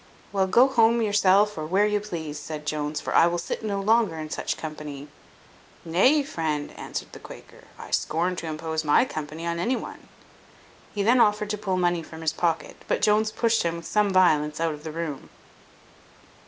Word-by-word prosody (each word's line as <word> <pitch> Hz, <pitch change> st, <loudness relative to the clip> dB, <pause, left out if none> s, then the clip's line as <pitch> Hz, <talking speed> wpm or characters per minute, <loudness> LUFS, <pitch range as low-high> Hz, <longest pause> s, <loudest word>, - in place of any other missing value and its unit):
"Well, 195 Hz, -1 st, +1 dB
go 240 Hz, +7 st, +5 dB
home 235 Hz, -3 st, +3 dB
yourself, 205 Hz, -1 st, +3 dB
or 155 Hz, -, -4 dB
where 195 Hz, +5 st, +3 dB
you 210 Hz, 0 st, +1 dB
please," 160 Hz, -7 st, -6 dB
said 150 Hz, -1 st, -7 dB
Jones, 150 Hz, 0 st, -2 dB
"for -, -, -4 dB
I 165 Hz, -, +6 dB
will 175 Hz, 0 st, -1 dB
sit 170 Hz, -, -4 dB
no 200 Hz, -2 st, -2 dB
longer 215 Hz, -4 st, +2 dB
in 155 Hz, -1 st, -6 dB
such -, -, -3 dB
company." 150 Hz, -2 st, -7 dB, 0.8 s
"Nay, 255 Hz, -, +3 dB
friend," 155 Hz, -, -3 dB
answered -, -, -7 dB
the -, -, -11 dB
Quaker, -, -, -13 dB
"I -, -, -10 dB
scorn 175 Hz, +3 st, 0 dB
to 165 Hz, -, -5 dB
impose 160 Hz, 0 st, -3 dB
my 150 Hz, +10 st, +4 dB
company 155 Hz, -, -6 dB
on 170 Hz, 0 st, -2 dB
any 240 Hz, +9 st, +1 dB
one." -, -, -8 dB, 0.8 s
He 205 Hz, -, -2 dB
then 240 Hz, +4 st, +4 dB
offered 210 Hz, -1 st, +2 dB
to 210 Hz, -, -2 dB
pull 190 Hz, -3 st, -1 dB
money 175 Hz, -1 st, +1 dB
from 160 Hz, 0 st, -11 dB
his 160 Hz, -, 0 dB
pocket, 170 Hz, -2 st, -2 dB
but -, -, -1 dB
Jones 215 Hz, +1 st, +3 dB
pushed 230 Hz, 0 st, +1 dB
him 170 Hz, 0 st, -1 dB
with 170 Hz, -, -10 dB
some 210 Hz, +2 st, +1 dB
violence 155 Hz, -6 st, +3 dB
out 165 Hz, -1 st, 0 dB
of 150 Hz, 0 st, -11 dB
the 160 Hz, -, -5 dB
room. 160 Hz, -3 st, -5 dB
175 Hz, 195 wpm, -25 LUFS, 155-210 Hz, 0.8 s, I